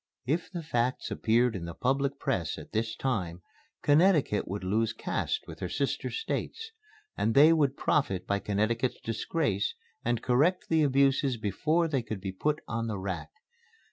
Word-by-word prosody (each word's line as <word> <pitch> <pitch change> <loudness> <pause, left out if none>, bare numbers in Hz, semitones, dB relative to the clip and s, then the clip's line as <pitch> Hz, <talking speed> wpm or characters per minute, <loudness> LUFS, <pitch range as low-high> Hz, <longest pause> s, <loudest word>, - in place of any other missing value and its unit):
If 155 +7 -1
the 175 -3 -5
facts 125 -4 -1
appeared 115 +1 +2
in 85 -3 -4
the 85 -1 -7
public 135 +2 0
press 95 - -1
at - - -10
this 110 +1 -1
time, 90 -11 -2 0.4
Connecticut 150 - +4
would 100 +1 -4
lose 110 +4 +1
caste 440 - -2
with - - -10
her - - -3
sister - - -1
States. 450 0 -4 0.4
And 110 - 0
they 155 +4 +8
would 145 -4 +2
profit 95 -11 +1
by 100 0 0
Connecticut's 115 +5 0
disgrace 115 - -1 0.3
and 120 -1 0
correct 150 +9 +2
the 160 -1 +3
abuses 135 -2 +3
before 155 - +1
they 140 -5 0
could 110 -3 -5
be 95 0 -4
put 150 +11 -1
on 115 0 -2
the 105 -3 -2
rack. 95 -2 -4
120 Hz, 165 wpm, -29 LUFS, 105-145 Hz, 0.4 s, they